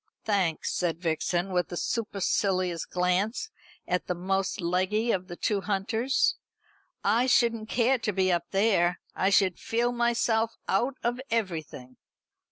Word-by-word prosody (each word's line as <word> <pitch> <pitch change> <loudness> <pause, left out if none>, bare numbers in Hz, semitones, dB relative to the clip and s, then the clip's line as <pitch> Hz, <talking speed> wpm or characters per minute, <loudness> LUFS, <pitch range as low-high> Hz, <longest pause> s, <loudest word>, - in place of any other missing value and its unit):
"Thanks," 190 -7 0
said 170 -2 -1
Vixen, 175 +2 -1
with 180 0 0
a 175 - -4
supercilious 190 -5 0
glance 190 - 0 0.4
at 180 0 -1
the 180 - -1
most 190 +2 -1
leggy 185 +6 +1
of 185 -3 -1
the 175 - -7
two 200 +2 0
hunters, 215 +6 +1 0.7
"I 230 +5 +3
shouldn't 230 -3 +2
care 250 +2 +2
to 215 - -1
be 185 -1 +1
up 175 -1 0
there. 195 -4 +2
I 190 - +1
should 195 -3 +3
feel 240 +1 0
myself 235 -2 +1
out 245 +7 +1
of 240 +2 -1
everything." 160 - -3
195 Hz, 140 wpm, -28 LUFS, 180-230 Hz, 0.7 s, I